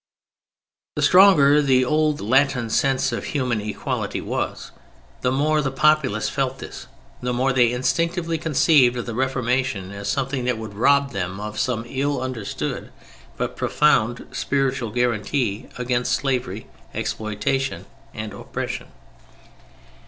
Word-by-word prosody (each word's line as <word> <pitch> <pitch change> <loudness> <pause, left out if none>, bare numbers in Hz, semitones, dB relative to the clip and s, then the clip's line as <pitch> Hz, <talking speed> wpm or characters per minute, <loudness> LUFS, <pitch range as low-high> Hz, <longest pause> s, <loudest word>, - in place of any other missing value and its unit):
The - - -1
stronger 155 -7 +6
the 130 -3 +3
old 155 +2 +1
Latin 125 0 +2
sense 135 0 +2
of 115 - -3
human 125 -6 -1
equality 105 -1 -3
was, - - -4 0.5
the 125 - +1
more 150 +3 +2
the 140 - -1
populace 135 -5 +2
felt - - -1
this, - - -9 0.3
the 125 - -1
more 130 +2 +1
they 120 -2 +4
instinctively 165 +7 0
conceived 145 -5 +4
of 120 - -3
the 115 - -5
Reformation 125 -5 -1
as 100 0 -5
something 135 +2 -1
that 125 -2 0
would 110 -2 -7
rob 140 +6 +3
them 95 0 -4
of 105 0 -5
some 120 -3 -1
ill 140 +2 -1
understood 125 -5 -4 0.5
but - - -3
profound 120 -5 +2
spiritual 135 -4 -1
guarantee 120 -1 -1
against 125 0 0
slavery, 130 -3 -1 0.3
exploitation 110 +6 -2 0.3
and 110 -1 -6
oppression. - - -5
130 Hz, 130 wpm, -22 LUFS, 115-140 Hz, 0.5 s, stronger